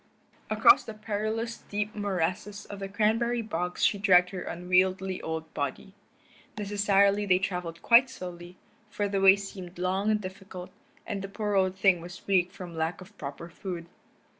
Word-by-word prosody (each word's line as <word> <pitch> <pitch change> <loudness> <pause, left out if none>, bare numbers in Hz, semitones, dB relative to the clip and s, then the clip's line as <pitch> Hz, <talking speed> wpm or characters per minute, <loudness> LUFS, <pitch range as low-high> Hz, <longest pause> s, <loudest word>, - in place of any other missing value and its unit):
Across - - +6
the 220 - -7
perilous 220 +2 -3
deep 210 +1 -2
morasses 200 +1 -2
of 200 - -8
the 195 - -4
cranberry 225 +4 +1
bogs 180 -4 -1
she 200 - +2
dragged 180 -3 +5
her 185 -2 -5
unwieldy 185 +2 0
old 160 0 -5
body. 145 +6 -4 0.6
Necessarily 205 0 +2
they 185 -1 +5
traveled 180 -3 -4
quite 245 +3 +6
slowly, 175 -2 -9 0.3
for 205 0 -1
the 195 -1 -1
way 195 0 +8
seemed 190 -3 -8
long 190 +3 0
and 215 -1 +2
difficult, 185 -1 -8 0.3
and 200 -1 -4
the 195 - -6
poor 210 0 -2
old 190 -1 +2
thing 190 -2 +3
was 175 +1 -10
weak 185 -2 +2
from 180 -3 -9
lack 160 +2 -2
of 190 +3 -14
proper 145 +3 -6
food. 175 0 -6
190 Hz, 165 wpm, -28 LUFS, 180-205 Hz, 0.6 s, way